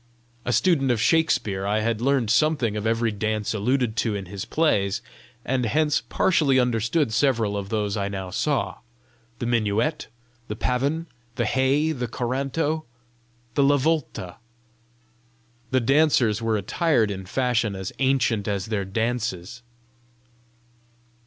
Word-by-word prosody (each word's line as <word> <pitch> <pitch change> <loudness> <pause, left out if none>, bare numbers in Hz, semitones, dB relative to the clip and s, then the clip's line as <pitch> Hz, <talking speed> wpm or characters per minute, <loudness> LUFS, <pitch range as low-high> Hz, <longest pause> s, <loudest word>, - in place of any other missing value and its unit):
A - - 0
student 140 -2 +2
of 120 -3 +2
Shakspere, 115 - +1
I 105 +1 +1
had 115 0 -1
learned 130 -4 +2
something 125 -3 +2
of 105 +1 -2
every 115 0 +1
dance 110 +1 -2
alluded 120 +2 0
to 110 -3 0
in 100 -1 -4
his 95 +1 -6
plays, 100 -12 +1 0.5
and 125 -2 0
hence 150 +6 +1
partially 145 -8 +2
understood 120 +2 +1
several 115 -4 +1
of 100 -1 -4
those 105 -1 -1
I 100 -2 -1
now 95 -2 -5
saw 145 +9 -1 0.6
the 120 - -4
minuet, 115 +5 0 0.4
the 105 - -4
pavin, 140 +8 -1 0.3
the 120 - 0
hey, 135 +6 +2
the 125 -5 -3
coranto, 135 +6 -2 0.7
the 140 - +2
lavolta. 140 - +1 1.3
The 130 - +2
dancers 130 -5 +3
were 115 -1 +1
attired 115 - +1
in 95 -1 -6
fashion 120 -2 0
as 95 -1 -5
ancient 130 -6 +1
as 100 -3 -1
their 105 -3 -2
dances. 115 -1 -3
115 Hz, 135 wpm, -24 LUFS, 105-135 Hz, 1.3 s, dancers